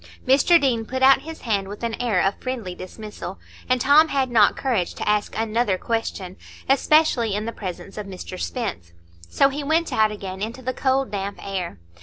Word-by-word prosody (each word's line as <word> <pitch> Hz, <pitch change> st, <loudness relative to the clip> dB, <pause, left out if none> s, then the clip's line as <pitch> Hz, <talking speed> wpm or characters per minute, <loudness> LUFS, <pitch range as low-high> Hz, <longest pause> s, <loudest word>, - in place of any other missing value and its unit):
Mr 280 Hz, +6 st, +5 dB
Deane 245 Hz, -6 st, +1 dB
put 260 Hz, +3 st, -3 dB
out 270 Hz, +1 st, +7 dB
his 320 Hz, +1 st, -9 dB
hand, 200 Hz, -5 st, -1 dB
with 205 Hz, +3 st, -9 dB
an 230 Hz, -1 st, -1 dB
air 220 Hz, -7 st, +2 dB
of 195 Hz, -, +2 dB
friendly 240 Hz, -8 st, -4 dB
dismissal, 195 Hz, +1 st, -8 dB, 0.3 s
and 255 Hz, 0 st, +3 dB
Tom 290 Hz, +5 st, +6 dB
had 270 Hz, -4 st, 0 dB
not 215 Hz, -4 st, +4 dB
courage 230 Hz, -10 st, -1 dB
to -, -, -5 dB
ask 210 Hz, 0 st, 0 dB
another 225 Hz, -2 st, 0 dB
question, 195 Hz, -4 st, -3 dB, 0.3 s
especially 270 Hz, -6 st, +3 dB
in 210 Hz, +1 st, -2 dB
the 230 Hz, -, -3 dB
presence 195 Hz, 0 st, -7 dB
of 205 Hz, -, -6 dB
Mr 185 Hz, -1 st, -8 dB
Spence. 190 Hz, -, -4 dB, 0.4 s
So 275 Hz, -, +4 dB
he 285 Hz, +1 st, -4 dB
went 320 Hz, +3 st, +1 dB
out 215 Hz, -1 st, +3 dB
again 195 Hz, -2 st, -7 dB
into 230 Hz, +5 st, -5 dB
the 255 Hz, +1 st, -2 dB
cold 265 Hz, 0 st, 0 dB
damp 200 Hz, 0 st, -4 dB
air. 185 Hz, -, -4 dB
225 Hz, 190 wpm, -23 LUFS, 195-265 Hz, 0.4 s, out